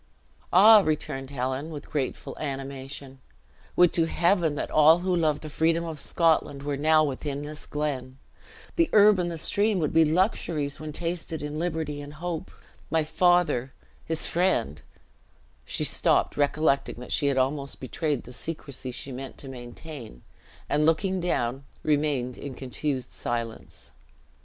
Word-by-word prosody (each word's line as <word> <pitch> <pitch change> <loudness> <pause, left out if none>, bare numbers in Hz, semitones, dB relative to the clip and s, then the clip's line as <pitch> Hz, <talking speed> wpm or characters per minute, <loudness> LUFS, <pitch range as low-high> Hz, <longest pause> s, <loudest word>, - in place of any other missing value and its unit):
"Ah!" 210 +4 +9
returned 145 -6 -2
Helen, 130 +2 -3
with 150 -3 -8
grateful 140 -4 -3
animation, 135 -1 -6 0.6
"would 180 -1 +5
to 165 - +3
Heaven 170 -2 +2
that - - -4
all 155 +2 +7
who 185 -1 +2
love 155 -3 +1
the 155 - -7
freedom 165 +2 +1
of 160 -4 -6
Scotland 160 -4 +1
were 145 0 -1
now 155 +2 +4
within 140 0 -3
this 150 +1 -9
glen! 135 -4 -3 0.6
The 335 -1 +3
herb 210 -2 +7
and 175 -1 0
the 170 - -4
stream 205 +5 +1
would 155 -4 -1
be 165 0 +6
luxuries 155 -4 0
when 155 0 -6
tasted 165 -1 -3
in 150 0 -4
liberty 160 -4 -2
and 145 +1 -9
hope. 170 0 -4 0.4
My 160 -1 +2
father, 175 -6 +2 0.3
his 160 -1 -1
friend 170 - 0 0.4
" 60 +1 -34
she - - -3
stopped, - - +2
recollecting 145 -1 +1
that 125 +1 -10
she 145 - +1
had 140 -1 +1
almost 140 +1 -1
betrayed 145 +1 -2
the 125 - -10
secrecy 135 -1 -5
she 135 +2 -6
meant 130 +1 -7
to 140 - -10
maintain, 125 - -9 0.4
and 150 +1 +2
looking 185 +4 +2
down, 135 -7 -1 0.2
remained 145 -5 0
in 140 -3 -6
confused 130 0 -3
silence. 115 -1 -5
150 Hz, 150 wpm, -26 LUFS, 135-165 Hz, 0.6 s, Ah